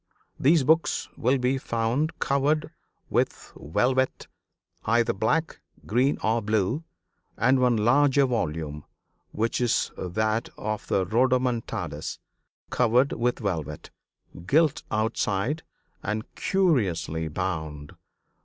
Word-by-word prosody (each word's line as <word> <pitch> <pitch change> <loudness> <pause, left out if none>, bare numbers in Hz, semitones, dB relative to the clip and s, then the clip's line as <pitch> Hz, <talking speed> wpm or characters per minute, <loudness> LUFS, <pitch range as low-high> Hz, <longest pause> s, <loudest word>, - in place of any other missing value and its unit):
These 150 +2 +4
books 160 +4 +2
will 130 +4 +2
be 130 +1 0
found 120 +8 -1
covered 150 +3 +1 0.4
with - - -1
velvet, 130 - 0 0.6
either 115 +1 +2
black, 150 +11 0 0.2
green 125 +6 +2
or 115 +2 +2
blue, 110 - 0 0.5
and 130 +3 +3
one 125 -2 +3
larger 135 +5 +4
volume, 80 - -2 0.5
which 115 +3 -1
is 120 -2 +1
that 110 +5 -1
of 110 0 -4
the 95 - +1
Rodomontades, 125 +2 0 0.5
covered 125 +3 +3
with 120 +1 0
velvet, 80 -8 -4 0.6
gilt 155 0 +3
outside 110 +5 0 0.4
and 110 +2 -4
curiously 100 - +1
bound. 80 -4 -4
115 Hz, 100 wpm, -26 LUFS, 100-135 Hz, 0.6 s, These